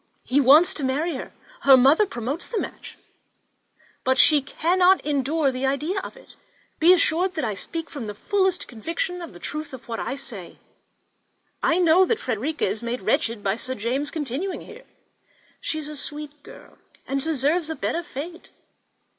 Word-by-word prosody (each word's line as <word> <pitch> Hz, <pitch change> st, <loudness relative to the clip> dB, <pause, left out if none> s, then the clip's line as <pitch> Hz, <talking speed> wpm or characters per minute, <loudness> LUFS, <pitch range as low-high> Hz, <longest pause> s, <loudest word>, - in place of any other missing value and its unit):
He 275 Hz, +3 st, +2 dB
wants 290 Hz, +6 st, +6 dB
to 295 Hz, -, -4 dB
marry 295 Hz, +6 st, 0 dB
her; 260 Hz, -, -6 dB, 0.3 s
her 270 Hz, -1 st, +8 dB
mother 285 Hz, +11 st, +5 dB
promotes 270 Hz, -, -4 dB
the 465 Hz, -, -4 dB
match, -, -, -7 dB, 1.1 s
but 260 Hz, +1 st, +2 dB
she 300 Hz, 0 st, +6 dB
cannot 360 Hz, +7 st, +3 dB
endure 290 Hz, 0 st, +1 dB
the 260 Hz, +1 st, -2 dB
idea 300 Hz, +8 st, -1 dB
of -, -, -8 dB
it. -, -, -17 dB, 0.4 s
Be 335 Hz, +3 st, +6 dB
assured 365 Hz, +1 st, +2 dB
that 310 Hz, -6 st, -1 dB
I 215 Hz, -, -1 dB
speak 330 Hz, +11 st, -4 dB
from 260 Hz, -7 st, -7 dB
the 210 Hz, -, -6 dB
fullest 380 Hz, -, 0 dB
conviction 330 Hz, -, -4 dB
of 335 Hz, -, -8 dB
the -, -, -13 dB
truth 300 Hz, -, -6 dB
of 260 Hz, -, -10 dB
what 230 Hz, -1 st, -4 dB
I 260 Hz, -, -3 dB
say; 215 Hz, -10 st, -7 dB, 1.0 s
I 335 Hz, -, +2 dB
know 355 Hz, +1 st, +5 dB
that 455 Hz, -, 0 dB
Frederica 260 Hz, +6 st, -2 dB
is 205 Hz, +3 st, -2 dB
made 235 Hz, -1 st, -3 dB
wretched 220 Hz, +1 st, 0 dB
by 195 Hz, +2 st, 0 dB
Sir 260 Hz, +2 st, -4 dB
James's 260 Hz, +7 st, -1 dB
continuing 310 Hz, +5 st, -4 dB
here. 480 Hz, +2 st, -13 dB, 0.7 s
She 315 Hz, -, -3 dB
is 305 Hz, -1 st, -4 dB
a 300 Hz, -, -6 dB
sweet 295 Hz, +1 st, -3 dB
girl, -, -, -15 dB, 0.3 s
and 275 Hz, 0 st, -1 dB
deserves 315 Hz, +2 st, +1 dB
a 320 Hz, -, -3 dB
better 340 Hz, -, -2 dB
fate. 340 Hz, +1 st, -8 dB
295 Hz, 175 wpm, -24 LUFS, 260-335 Hz, 1.1 s, her